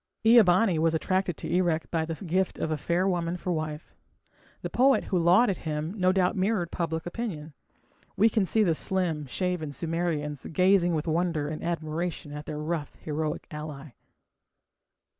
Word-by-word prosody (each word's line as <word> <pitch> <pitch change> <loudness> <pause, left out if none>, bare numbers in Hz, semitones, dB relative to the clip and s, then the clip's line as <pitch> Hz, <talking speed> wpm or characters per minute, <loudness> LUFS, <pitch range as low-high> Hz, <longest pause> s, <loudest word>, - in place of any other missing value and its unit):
Ea 230 +1 +8
bani 185 -2 +3
was 165 0 +2
attracted 185 +1 0
to - - -6
Erech 170 -1 0
by 160 -1 0
the 165 0 -4
gift 185 +1 -1
of 160 - -2
a - - +1
fair 170 +5 0
woman 175 -2 -1
for 180 - -3
wife. 155 -1 -4 0.7
The - - -2
poet 265 +2 +4
who 185 - 0
lauded 185 +5 +4
him 155 +2 -3
no 185 -3 +3
doubt 185 +2 +2
mirrored 190 -3 0
public 165 -2 -2
opinion. 175 -6 -5 0.6
We 210 +4 +6
can 215 -3 +1
see 220 +3 +2
the 170 -5 +3
slim, 165 -4 -1
shaven 180 0 -2
Sumerians 160 -3 -3
gazing 180 0 +3
with 155 - -2
wonder 160 -2 0
and 155 - -5
admiration 165 -2 -3
on 150 - -5
their 155 - -4
rough 150 0 -3
heroic 155 +1 -3
ally. 150 -2 -7
170 Hz, 165 wpm, -27 LUFS, 155-185 Hz, 0.7 s, Ea